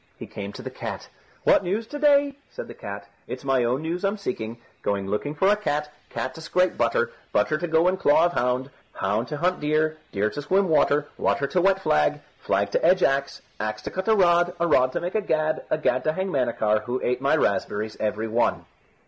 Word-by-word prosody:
He -, -, -7 dB
came 100 Hz, 0 st, -7 dB
to -, -, -9 dB
the -, -, -6 dB
cat. -, -, -6 dB, 0.3 s
"What -, -, +4 dB
news 205 Hz, +6 st, -1 dB
to 290 Hz, +6 st, -7 dB
day?" 285 Hz, -1 st, +4 dB
said -, -, -8 dB
the -, -, -9 dB
cat. 100 Hz, 0 st, -8 dB, 0.2 s
"It's 125 Hz, -, -6 dB
my 135 Hz, -2 st, +2 dB
own 125 Hz, +5 st, 0 dB
news 170 Hz, +3 st, -3 dB
I'm 200 Hz, +2 st, 0 dB
seeking. 115 Hz, -, -4 dB, 0.2 s
Going 100 Hz, -1 st, -1 dB
looking 105 Hz, +10 st, -2 dB
for 190 Hz, +6 st, +2 dB
a 205 Hz, -, +5 dB
cat, 150 Hz, -8 st, -2 dB, 0.2 s
cat 130 Hz, 0 st, -4 dB
to 160 Hz, -, -10 dB
scrape 180 Hz, +3 st, +1 dB
butter, 480 Hz, 0 st, +1 dB, 0.2 s
butter 155 Hz, 0 st, +1 dB
to 175 Hz, -, -2 dB
go 160 Hz, +1 st, +3 dB
in 185 Hz, +1 st, +2 dB
claw 160 Hz, -2 st, +4 dB
of 175 Hz, -, 0 dB
hound, 125 Hz, +1 st, 0 dB, 0.2 s
hound 105 Hz, +5 st, -1 dB
to 150 Hz, -, -4 dB
hunt 180 Hz, +3 st, 0 dB
deer, 155 Hz, +1 st, 0 dB
deer 105 Hz, +1 st, 0 dB
to 145 Hz, -, -5 dB
swim 190 Hz, +5 st, +1 dB
water, 150 Hz, -1 st, +3 dB
water 140 Hz, -, +1 dB
to 175 Hz, +6 st, +1 dB
wet 190 Hz, +1 st, +2 dB
flag, 75 Hz, -1 st, +2 dB, 0.2 s
flag 100 Hz, +1 st, 0 dB
to -, -, 0 dB
edge 185 Hz, +2 st, +4 dB
axe, 140 Hz, 0 st, 0 dB, 0.2 s
axe 110 Hz, 0 st, -3 dB
to -, -, -5 dB
cut 190 Hz, +2 st, -4 dB
a 220 Hz, -, +5 dB
rod, 175 Hz, -2 st, +3 dB
a 170 Hz, -, +2 dB
rod 130 Hz, -6 st, +3 dB
to -, -, -2 dB
make 175 Hz, +1 st, -3 dB
a 215 Hz, -, +1 dB
gad, 155 Hz, -5 st, 0 dB, 0.2 s
gad 130 Hz, +1 st, +2 dB
to 155 Hz, -, +2 dB
hang 190 Hz, +3 st, -2 dB
Manachar, 115 Hz, -, +1 dB
who 125 Hz, +1 st, -2 dB
ate 125 Hz, +1 st, 0 dB
my 140 Hz, +3 st, +3 dB
raspberries 105 Hz, -4 st, -1 dB
every 110 Hz, +1 st, -1 dB
one." 115 Hz, +2 st, 0 dB
150 Hz, 225 wpm, -25 LUFS, 120-180 Hz, 0.3 s, a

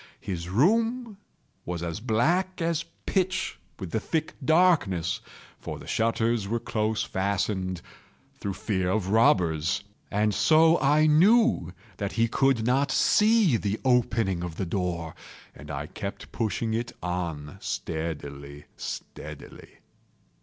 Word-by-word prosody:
His 85 Hz, -3 st, -5 dB
room 225 Hz, -, +1 dB, 0.5 s
was 85 Hz, -1 st, -4 dB
as 85 Hz, +2 st, -3 dB
black 165 Hz, -, +1 dB
as 170 Hz, 0 st, 0 dB, 0.2 s
pitch 185 Hz, -1 st, -1 dB, 0.2 s
with 95 Hz, -5 st, -6 dB
the 110 Hz, -, 0 dB
thick 155 Hz, +7 st, -2 dB
darkness, 155 Hz, -, +3 dB, 0.4 s
(for -, -, -6 dB
the -, -, -11 dB
shutters 115 Hz, -1 st, 0 dB
were 115 Hz, +3 st, -1 dB
close 110 Hz, -1 st, -1 dB
fastened, 95 Hz, -2 st, -2 dB, 0.6 s
through 100 Hz, -2 st, -3 dB
fear 95 Hz, -2 st, -1 dB
of 95 Hz, 0 st, 0 dB
robbers,) 90 Hz, -6 st, +3 dB, 0.3 s
and 105 Hz, +1 st, +1 dB
so 160 Hz, +5 st, +5 dB
I 150 Hz, +2 st, +4 dB
knew 185 Hz, -, +4 dB, 0.3 s
that 100 Hz, -1 st, -3 dB
he 115 Hz, 0 st, +2 dB
could 130 Hz, -1 st, +2 dB
not 135 Hz, +4 st, +2 dB
see 210 Hz, -, +4 dB
the 105 Hz, 0 st, -2 dB
opening 115 Hz, -7 st, +2 dB
of 85 Hz, -2 st, -5 dB
the 95 Hz, -, -2 dB
door, 85 Hz, -3 st, -2 dB, 0.4 s
and 75 Hz, -, -12 dB
I 75 Hz, 0 st, -4 dB
kept 100 Hz, +5 st, -7 dB
pushing 110 Hz, 0 st, -1 dB
it 115 Hz, +1 st, -2 dB
on 85 Hz, -5 st, -4 dB
steadily, 75 Hz, -3 st, -5 dB
steadily. -, -, -9 dB
110 Hz, 125 wpm, -27 LUFS, 90-150 Hz, 0.6 s, so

